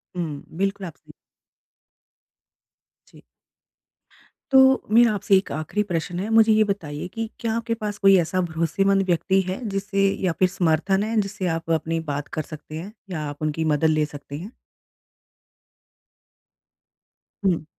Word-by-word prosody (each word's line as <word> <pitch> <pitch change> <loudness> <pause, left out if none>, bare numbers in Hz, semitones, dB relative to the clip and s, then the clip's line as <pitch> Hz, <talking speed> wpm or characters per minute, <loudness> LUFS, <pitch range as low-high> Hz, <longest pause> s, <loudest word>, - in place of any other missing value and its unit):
हुँ। 160 -5 -4
बिल्कुल 195 +1 -1
आप 160 - -10
सही - - -18 2.0
जी। - - -18 1.3
तो 265 0 +6
मेरा 235 -1 +6
आपसे 200 -1 +2
एक 190 - -2
आखिरी 155 +8 -2
प्रश्न 175 -2 -3
है, 200 +4 -3
मुझे 225 0 +5
ये 215 0 +5
बताइए 175 -7 -4
कि 225 -1 -3
क्या 230 -2 -1
आपके 230 0 -2
पास 210 -2 -4
कोई 195 -1 +6
ऐसा 175 +2 0
भरोसेमंद 175 +4 +1
व्यक्ति 190 +2 +2
है 185 - -3
जिससे 195 0 0 0.2
या 180 - +2
फिर 185 - +5
समर्थन 185 +3 +1
है 220 +1 0
जिससे 200 -1 -4
आप 165 0 -5
अपनी 165 +1 0
बात 145 0 -4
कर 155 - -1
सकते 155 0 -10
हैं? 175 +6 -6 0.2
या 170 -4 -4
आप 145 +1 -10
उनकी 155 +1 -1
मदद 150 0 +1
ले 155 -1 +2
सकते 145 -1 -9
हैं? 190 +7 -8 2.9
हुँ। 175 -5 +2
185 Hz, 150 wpm, -23 LUFS, 160-205 Hz, 2.9 s, तो